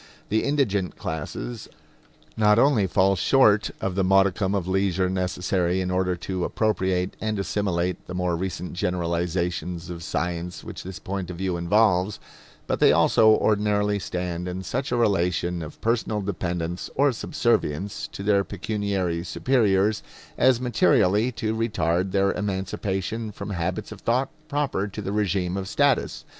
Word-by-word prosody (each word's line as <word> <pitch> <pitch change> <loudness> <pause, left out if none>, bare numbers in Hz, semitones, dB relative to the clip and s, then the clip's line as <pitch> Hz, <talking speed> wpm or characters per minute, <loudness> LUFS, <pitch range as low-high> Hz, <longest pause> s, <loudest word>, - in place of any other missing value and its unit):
The 110 +2 +1
indigent 105 - 0
classes 75 -6 -5 0.7
not 105 -1 +4
only 120 -6 +4
fall 95 +2 +3
short 105 +1 +4
of 95 - -2
the 95 +1 +1
modicum 95 +1 +3
of 95 -3 -2
leisure 95 -1 +1
necessary 90 0 0
in 90 -1 -1
order 90 0 +1
to 90 +1 -4
appropriate 95 -4 0
and 110 -1 -1
assimilate 90 -3 -1
the 90 - -6
more 90 -1 0
recent 90 0 -4
generalizations 85 0 -2
of 85 -1 -7
science 85 +3 -3
which - - -7
this 95 0 -7
point 95 -2 -5
of 90 - -6
view 95 -1 -1
involves, 95 +2 +2 0.5
but - - -1
they - - +6
also 110 - +5
ordinarily 105 -1 +2
stand 90 -1 -4
in 90 +1 -4
such 130 +6 -3
a - - +2
relation 90 -5 +1
of 80 -1 -8
personal 110 -2 0
dependence 90 -3 -3
or 140 +1 +4
subservience 110 - -1
to 155 -11 -8
their 100 -1 +3
pecuniary 100 -4 -2
superiors 105 -1 +2 0.3
as 130 -2 +4
materially 120 - +3
to 110 -1 -2
retard 95 -5 0
their 100 0 +2
emancipation 100 +2 -3
from 105 - -7
habits 90 0 -3
of - - -9
thought 130 +3 +1 0.2
proper 140 -9 -1
to 100 - -8
the 100 - -3
regime 95 -3 0
of 95 -1 -3
status. - - +1
95 Hz, 150 wpm, -25 LUFS, 90-105 Hz, 0.7 s, they